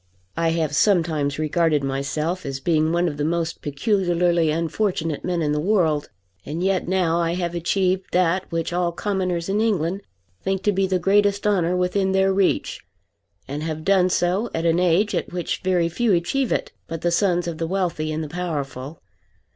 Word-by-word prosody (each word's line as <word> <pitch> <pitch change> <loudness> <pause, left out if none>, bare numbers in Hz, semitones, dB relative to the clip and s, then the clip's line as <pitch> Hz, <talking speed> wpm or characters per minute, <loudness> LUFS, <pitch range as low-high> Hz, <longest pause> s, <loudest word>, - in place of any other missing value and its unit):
I 165 0 +1
have 160 -3 -1
sometimes 160 -7 +2
regarded 155 -1 +1
myself 150 +6 -2
as 135 -1 -4
being 155 +1 +1
one 175 +1 +2
of 145 -3 -3
the 145 - -1
most 165 +1 -1
peculiarly 175 +1 +1
unfortunate 165 0 -1
men 175 -2 -1
in 150 - 0
the 150 - 0
world, 160 -5 +1 0.3
and 160 - -4
yet 190 -2 +1
now 175 -2 +1
I 170 0 0
have 175 -1 -2
achieved 185 +2 0
that 180 +1 +1
which 165 0 -2
all 175 -1 +1
commoners 185 -3 -2
in 200 +2 +1
England 195 -4 0 0.4
think 190 0 -2
to 205 - +3
be 195 -1 +1
the 185 0 +1
greatest 200 +2 +2
honour 180 -4 +2
within 190 +1 +1
their 190 0 +3
reach, 195 -1 0 0.6
and 145 +2 -4
have 155 0 -4
done 190 -2 +4
so 185 +6 +1
at 165 +1 -1
an 165 +1 +3
age 180 +4 +2
at - - -2
which 175 -1 -3
very 180 -2 +2
few 210 +6 +1
achieve 220 +9 0
it - - -1 0.2
but 165 -1 -5
the 175 - +1
sons 175 -1 +2
of 165 -2 -4
the 165 - -1
wealthy 175 -4 -1
and 155 +1 -2
the - - -5
powerful. 145 -4 -5
175 Hz, 185 wpm, -23 LUFS, 160-190 Hz, 0.6 s, done